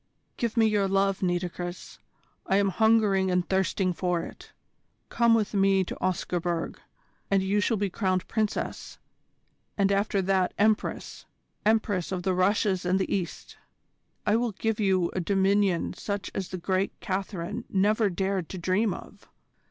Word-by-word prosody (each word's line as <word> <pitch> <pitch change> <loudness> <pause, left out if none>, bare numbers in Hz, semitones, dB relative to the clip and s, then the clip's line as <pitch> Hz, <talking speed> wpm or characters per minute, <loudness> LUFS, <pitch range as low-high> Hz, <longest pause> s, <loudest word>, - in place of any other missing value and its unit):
Give 235 0 -2
me 225 - +5
your 210 -2 +2
love, 195 0 +1
Nitocris. 175 -1 -3 0.5
I 195 - +2
am 200 0 +3
hungering 210 -2 +3
and 180 -1 +1
thirsting 190 -1 +1
for 175 -1 -1
it. - - -11 0.6
Come 235 -1 +4
with 215 -2 0
me 195 -1 +3
to - - -6
Oscarburg, 175 -2 -2 0.5
and 195 -1 +2
you 200 +2 +1
shall 220 +2 +1
be 200 -1 -1
crowned 185 -2 -1
Princess 215 -2 -3 0.8
and 200 -1 +2
after 200 0 +1
that 185 -1 +1
Empress 215 +1 0 0.4
Empress 210 -5 +1
of 180 -2 -3
the 190 - +1
Russias 190 +1 +1
and 180 +1 +2
the 190 - 0
East. 180 -4 -5 0.7
I 210 +2 +3
will 235 -2 -1
give 225 +2 -2
you 190 -4 +2
a - - -1
dominion 195 0 +1
such 200 -4 -4
as 190 -2 -4
the 185 - -4
great 185 +2 -1
Catherine 190 -2 -4
never 210 +2 +2
dared 190 -1 -2
to 190 - -6
dream 185 +4 +1
of. - - -13
195 Hz, 150 wpm, -27 LUFS, 185-205 Hz, 0.8 s, me